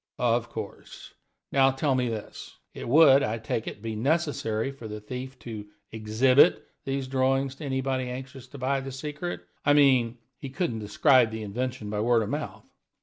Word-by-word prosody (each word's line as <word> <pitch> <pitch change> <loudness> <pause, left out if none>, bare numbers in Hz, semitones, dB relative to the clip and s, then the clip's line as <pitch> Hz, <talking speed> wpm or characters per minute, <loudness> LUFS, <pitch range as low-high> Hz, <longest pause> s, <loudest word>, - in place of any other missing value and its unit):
"Of 120 -1 +1
course. 110 -3 -9 0.4
Now 135 -1 +5
tell 135 +1 0
me 125 -2 +1
this: 110 -2 -7 0.2
It - - -7
would, 140 -1 +7
I 110 -2 -1
take 110 0 -3
it, 105 - -7
be 110 -1 -3
necessary 135 -3 0
for 135 -5 -10
the 105 0 -6
thief 125 +4 -7
to 110 -3 -7 0.2
exhibit 110 +5 +4 0.2
these 135 -1 -2
drawings 135 0 +1
to 155 - -7
anybody 130 -1 -1
anxious 130 +1 -8
to 140 - -11
buy 135 +1 0
the 135 0 -6
secret 150 +6 -5 0.2
I 145 - +4
mean, 130 -5 +4 0.2
he 140 - -6
couldn't 130 -6 -2
describe 120 +4 +4
the 110 0 -5
invention 120 +1 -4
by 105 - -2
word 115 +1 +3
of 105 - -5
mouth." - - -5
130 Hz, 175 wpm, -27 LUFS, 110-135 Hz, 0.4 s, would